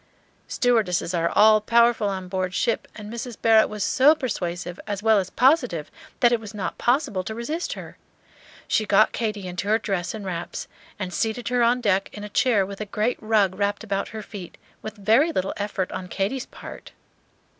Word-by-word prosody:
Stewardesses 215 -8 +1
are 170 -1 +1
all 215 0 +5
powerful 235 -1 +3
on 190 -2 -4
board 185 0 -2
ship, 230 - 0
and 210 0 -8
Mrs. 235 -1 -6
Barrett 225 -1 +5
was 210 -2 -3
so 265 +9 +5
persuasive 180 - -4
as 205 -1 -4
well 220 -2 +5
as 185 -1 -3
positive 250 - +2 0.3
that 240 - +6
it 240 - +2
was 215 -1 -10
not 200 - -4
possible 245 -7 +1
to 220 +4 -5
resist 305 +9 -3
her. - - -10 0.7
She 215 - +1
got 205 +2 +5
Katy 210 -4 -3
into 180 +2 -4
her 215 +1 +4
dress 190 -4 -3
and 210 -2 -7
wraps, 175 -2 -5 0.3
and 185 -3 -5
seated 225 +4 -1
her 250 -1 +1
on 240 +1 +3
deck 195 -3 +1
in 205 - -8
a 210 - -6
chair 210 -3 +2
with 200 +1 -8
a - - -2
great 215 +4 -1
rug 215 -4 +2
wrapped 200 +2 -1
about 200 -3 -2
her 215 0 -7
feet, 195 -4 -9 0.2
with 215 0 -7
very 225 - +3
little 190 - -1
effort 200 -2 -3
on 180 - -5
Katy's 205 +9 -2
part. - - -11
210 Hz, 190 wpm, -24 LUFS, 190-235 Hz, 0.7 s, that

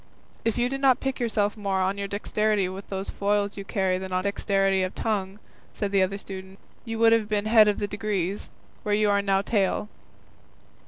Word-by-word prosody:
"If 225 0 0
you 240 0 +2
did 270 +1 -4
not 265 -2 +5
pique 270 0 -3
yourself 210 -4 0
more 200 -3 -1
on 190 +1 +1
your 200 - -2
dexterity 210 0 0
with 190 +2 -8
those 195 0 -4
foils 205 0 0
you 200 - -6
carry 190 -2 0
than 190 0 -6
on 185 0 0
dexterity 195 -1 +1
of 185 0 -2
tongue," 200 -3 -2 0.4
said 200 -1 -2
the 195 -1 +3
other 190 +1 0
student, 190 -1 -9 0.3
"you 225 -1 -4
would 225 0 +5
have 220 -2 +1
been 210 -1 0
head 215 -1 +6
of 205 - +2
the 205 - -1
degrees, 205 -2 -2 0.3
where 205 -1 +1
you 210 -1 +3
are 200 0 +3
now 195 -1 +1
tail." 205 -1 0
200 Hz, 205 wpm, -26 LUFS, 195-215 Hz, 0.4 s, head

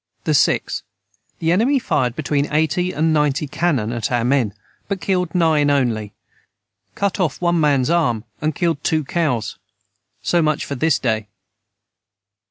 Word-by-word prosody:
The 100 - -1
enemy 235 +10 +3
fired 125 - 0
between 145 -1 -1
80 160 +4 +1
and 160 0 +1
90 150 -1 +1
Canon 135 -10 0
at 120 -1 -3
our 120 -1 +1
men 120 -5 +1 0.3
but 200 -2 -2
killed 180 -1 -1
nine 160 -4 +3
onely 115 -7 0 0.8
cut 200 -1 -1
of 170 -7 0
one 175 -1 +1
mans 145 -2 +2
arm 120 -11 +1 0.2
and 155 0 -1
killed 165 -4 -1
too 155 -1 +1
cows 135 -7 -1 0.6
So 175 - +2
much 155 -1 0
for - - -5
this 160 +5 +2
day. 110 -3 -1
150 Hz, 140 wpm, -20 LUFS, 125-170 Hz, 0.8 s, enemy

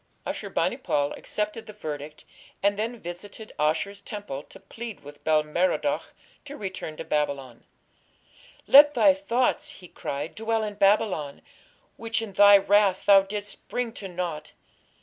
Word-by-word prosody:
Ashur - - -4
bani - - 0
pal 145 0 0
accepted 210 +2 -4
the 210 - -9
verdict, 150 -6 -7 0.4
and 200 0 +3
then 225 +3 -3
visited 195 +5 -9
Ashur's 165 +7 0
temple 205 - -6
to - - -15
plead 230 -3 -9
with 145 0 -13
Bel 155 -1 +3
Merodach 185 - -1 0.3
to 290 0 -8
return 185 -6 -6
to - - -5
Babylon. 140 -5 -2 1.0
"Let 290 +1 +8
thy 290 - +6
thoughts", 255 -3 0
he 180 - -12
cried, 145 -1 -5
"dwell 225 0 -1
in 210 -1 -3
Babylon, 200 -7 +1 0.5
which 225 -1 -2
in 225 -3 -6
thy 205 +1 +8
wrath 200 -1 +3
thou 200 -1 +8
didst 205 +1 -7
bring 245 -2 -3
to 200 - -7
naught. 175 -4 -5
200 Hz, 150 wpm, -26 LUFS, 155-220 Hz, 1.0 s, Let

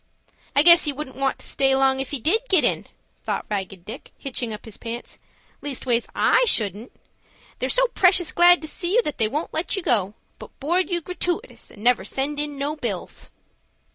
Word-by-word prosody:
"I 285 - +6
guess 340 +1 +7
he 295 - +1
wouldn't 270 -2 -7
want 270 0 -1
to - - -5
stay 270 -1 +2
long 265 0 +2
if 270 - -3
he 285 - -3
did 335 - +2
get 370 -5 +4
in," - - 0 0.4
thought - - -3
Ragged 190 -3 -4
Dick, 225 +5 -9
hitching 245 -4 -3
up 215 - -8
his 220 - -11
pants. 235 +1 -8 0.4
"Leastways 255 -4 -1
I - - +4
shouldn't. 215 - +1 0.7
They're - - -2
so - - +3
precious 365 -5 +3
glad 350 -1 +5
to - - -4
see 350 +3 -3
you 485 - +4
that 300 - -4
they 220 - +3
won't 300 +9 -4
let 325 +3 -1
you 385 - -4
go, 205 - +1 0.2
but - - -13
board 350 +7 0
you 345 -2 -1
gratooitous, 360 +6 -4
and 210 - -14
never 245 +1 +3
send 290 +2 -1
in 295 -1 -2
no 285 +2 -2
bills." 225 - -5
275 Hz, 200 wpm, -23 LUFS, 235-345 Hz, 0.7 s, guess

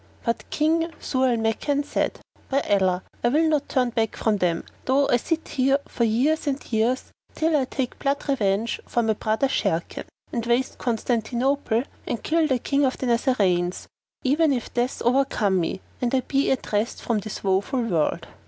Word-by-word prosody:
But 230 -1 -2
King 325 +2 +1
Zau 260 -1 +1
al 240 - +2
Makan 225 +6 0
said, - - -1 0.3
"By 275 +1 +2
Allah, 190 -3 +1 0.2
I - - +4
will 310 +6 +3
not 300 -2 +1
turn 250 -3 +1
back 225 -2 0
from 215 -2 +1
them, 175 -3 0 0.2
though 275 +2 +3
I 245 - +5
sit 325 +6 -2
here 270 +1 +3
for 235 - 0
years 275 +9 +1
and 275 -3 -3
years, 230 +4 +1 0.2
till 320 0 +2
I 275 -3 +2
take 260 -1 -4
blood 280 +1 -1
revenge 220 -4 0
for 240 - +1
my 220 -1 +2
brother 220 +5 0
Sharrkan 170 -9 -1 0.3
and 235 - -1
waste 240 +2 0
Constantinople 240 +1 0 0.2
and 235 - -3
kill 320 0 +2
the 260 -3 +2
King 280 +4 0
of 265 -1 +1
the - - -3
Nazarenes, 200 -8 +1 0.4
even 295 +4 +3
if 245 -3 -4
death 245 +2 -1
overcome 240 -6 +2
me 175 +2 -2 0.2
and 245 +1 +1
I 260 - +3
be 275 +2 0
at 265 - -1
rest 210 +3 0
from 230 -3 +1
this 210 +1 -7
woeful 200 +7 +1
world!" 170 -9 0
245 Hz, 180 wpm, -24 LUFS, 220-275 Hz, 0.4 s, I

